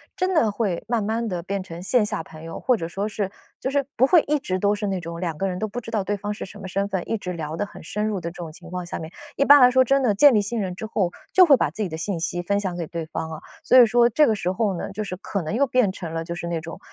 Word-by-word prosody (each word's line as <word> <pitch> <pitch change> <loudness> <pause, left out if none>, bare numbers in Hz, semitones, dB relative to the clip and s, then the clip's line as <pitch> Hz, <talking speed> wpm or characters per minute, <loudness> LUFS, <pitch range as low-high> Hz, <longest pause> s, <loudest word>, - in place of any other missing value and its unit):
真 370 +1 0
的 230 -10 +3
会 200 -5 -2
慢 235 -2 0
慢 225 +2 -1
地 180 -4 -3
变 195 +2 -3
成 170 -2 -9
线 215 +4 +2
下 210 - -3
朋 160 0 -12
友， 165 0 -7
或 250 -2 +2
者 165 -4 -4
说 195 +4 -3
是 200 -2 -3 0.3
就 265 - -2
是 280 -1 0
不 250 - +6
会 330 +4 +6
一 300 +1 +2
直 185 -8 -3
都 205 +2 +2
是 205 0 -4
那 190 -2 -1
种 170 0 -6
两 170 -3 -2
个 195 - 0
人 180 -1 -3
都 220 - -2
不 240 +4 -5
知 225 - -9
道 215 -3 -1
对 205 +2 -1
方 205 +1 -4
是 - - -6
什 205 +2 -12
么 190 - -6
身 195 +2 -1
份， 190 -3 -4
一 225 - 0
直 180 -3 -5
聊 160 -1 -5
得 205 - -1
很 200 - -12
深 210 +6 -2
入 205 -4 -2
的 170 - -3
这 170 - -15
种 170 -3 -7
情 175 +1 -13
况 180 0 -4
下 175 - -5
面。 160 +1 -7 0.2
一 - - +2
般 285 +1 +8
来 250 -1 +7
说 260 +1 +5
真 275 +2 +2
的， 225 -5 +3
建 275 +5 +6
立 210 - +4
信 215 +2 -2
任 185 -2 -3
之 220 - -6
后， 195 -5 0 0.2
就 370 -1 +7
会 280 -4 +7
把 - - 0
自 - - -6
己 200 - -1
的 160 - -5
信 170 +2 -2
息 175 +1 -2
分 200 +3 +1
享 190 -3 -3
给 170 - -3
对 165 0 -5
方 160 0 -5
啊， 160 - -7 0.2
所 - - +3
以 245 - +9
说 240 +1 +4
这 290 +6 +4
个 220 - +2
时 180 -3 -1
候 195 -1 0
呢， - - -5
就 215 +2 -4
是 185 -3 -5
可 195 0 -3
能 160 +5 -3
又 280 +4 +3
变 250 -6 +2
成 170 -4 -7
了 165 0 -2
就 170 +1 -5
是 175 - -6
那 170 -2 -2
种， 165 +1 -8
200 Hz, 355 characters per minute, -23 LUFS, 175-225 Hz, 0.3 s, 以